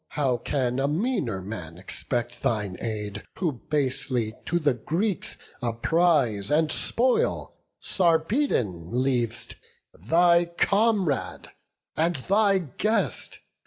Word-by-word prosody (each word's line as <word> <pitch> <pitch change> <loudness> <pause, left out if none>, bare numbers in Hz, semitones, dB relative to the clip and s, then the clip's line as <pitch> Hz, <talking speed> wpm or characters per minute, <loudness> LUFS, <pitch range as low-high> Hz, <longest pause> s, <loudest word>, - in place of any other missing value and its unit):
How 135 -4 +2
can 125 +1 -1
a 135 - +1
meaner 150 - -1
man 90 -5 -7
expect 120 +5 -4
thine 105 -5 -1
aid, 105 -3 -4 0.2
Who 175 -4 0 0.2
basely 130 -5 -1
to 175 - +1
the 150 -5 +2
Greeks 170 - -2 0.2
a 120 -2 -1
prize 135 - +2
and 155 +1 +2
spoil 250 +2 0 0.3
Sarpedon 160 - +1
leav'st, 120 -2 -1 0.4
thy 170 - +4
comrade 195 - 0 0.4
and 165 +2 +1
thy 200 +8 +3
guest? 190 - -2
140 Hz, 105 wpm, -26 LUFS, 115-175 Hz, 0.4 s, thy